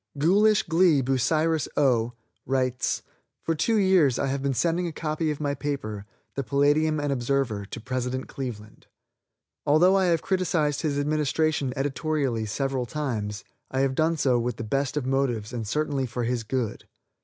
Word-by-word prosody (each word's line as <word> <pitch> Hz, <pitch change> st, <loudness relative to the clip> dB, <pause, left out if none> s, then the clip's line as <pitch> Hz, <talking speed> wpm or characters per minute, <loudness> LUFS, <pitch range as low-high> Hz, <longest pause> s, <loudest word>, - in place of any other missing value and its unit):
"Ghoulish 205 Hz, +8 st, +4 dB
Glee," 165 Hz, -3 st, +4 dB
Bucyrus, 155 Hz, +5 st, +1 dB
O., 120 Hz, -5 st, +2 dB, 0.3 s
writes: 130 Hz, -1 st, 0 dB, 0.4 s
"For 165 Hz, -, 0 dB
two 220 Hz, +8 st, +1 dB
years 185 Hz, -, +4 dB
I -, -, 0 dB
have 135 Hz, 0 st, -2 dB
been 135 Hz, -1 st, 0 dB
sending 175 Hz, +5 st, +1 dB
a -, -, -3 dB
copy 155 Hz, 0 st, -2 dB
of 150 Hz, -, -3 dB
my 145 Hz, -2 st, -1 dB
paper, 120 Hz, -8 st, -4 dB, 0.3 s
the 140 Hz, -, -2 dB
'Palladium 145 Hz, +3 st, +2 dB
and 145 Hz, -1 st, 0 dB
Observer' 120 Hz, -5 st, -1 dB
to 120 Hz, -, -7 dB
President 125 Hz, +2 st, -3 dB
Cleveland. 110 Hz, -5 st, -7 dB, 0.8 s
Although 160 Hz, +6 st, +5 dB
I 190 Hz, -1 st, +3 dB
have 170 Hz, -2 st, +2 dB
criticised 170 Hz, -6 st, 0 dB
his 150 Hz, -3 st, -1 dB
administration 150 Hz, -1 st, 0 dB
editorially 135 Hz, -4 st, -1 dB
several 130 Hz, +2 st, -2 dB
times, 115 Hz, -8 st, -3 dB, 0.3 s
I 130 Hz, -, 0 dB
have 135 Hz, -1 st, +1 dB
done 160 Hz, +3 st, +1 dB
so 130 Hz, -4 st, +2 dB
with 120 Hz, 0 st, -2 dB
the -, -, -4 dB
best 135 Hz, +6 st, -1 dB
of 140 Hz, -, -1 dB
motives 130 Hz, -5 st, -1 dB
and 115 Hz, -3 st, -4 dB
certainly 145 Hz, 0 st, -1 dB
for 120 Hz, +1 st, -3 dB
his 120 Hz, 0 st, -1 dB
good. 115 Hz, -1 st, -3 dB
140 Hz, 165 wpm, -26 LUFS, 125-155 Hz, 0.8 s, Although